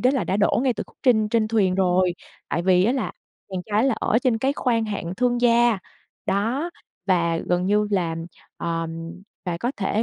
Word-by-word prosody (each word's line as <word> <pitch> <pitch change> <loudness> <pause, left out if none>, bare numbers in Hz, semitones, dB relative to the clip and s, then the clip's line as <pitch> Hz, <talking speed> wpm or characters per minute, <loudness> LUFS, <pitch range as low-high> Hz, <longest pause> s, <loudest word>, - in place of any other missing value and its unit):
đó 250 - +4
là 265 - 0
đã 190 - 0
đổ 205 +3 +2
ngay 260 - +2
từ - - -4
khúc - - -23
trên 220 -5 +4
trên 220 -1 +1
thuyền 200 -5 +2
rồi, 185 -1 +2 0.3
tại 170 - -1
vì 185 0 +4
á 240 - +3
là 260 -5 -2 0.4
chàng 190 -1 -3
trai 210 0 +2
đó 270 - +3
là 260 - +2
ở 225 - +2
trên 245 -2 +1
cái 265 +4 +1
khoang 235 -5 0
hạng 185 -4 -4
thương 245 0 +1
gia. 235 -3 +4 0.5
Đó. 240 - 0 0.4
Và 170 -3 +2
gần 180 +2 0
như 210 +1 +2
là, 175 -5 0 0.4
ừm, 165 +1 -4 0.2
và 175 -2 -2
có 240 +7 -1
thể, 205 +2 0
205 Hz, 210 wpm, -23 LUFS, 180-235 Hz, 0.5 s, đó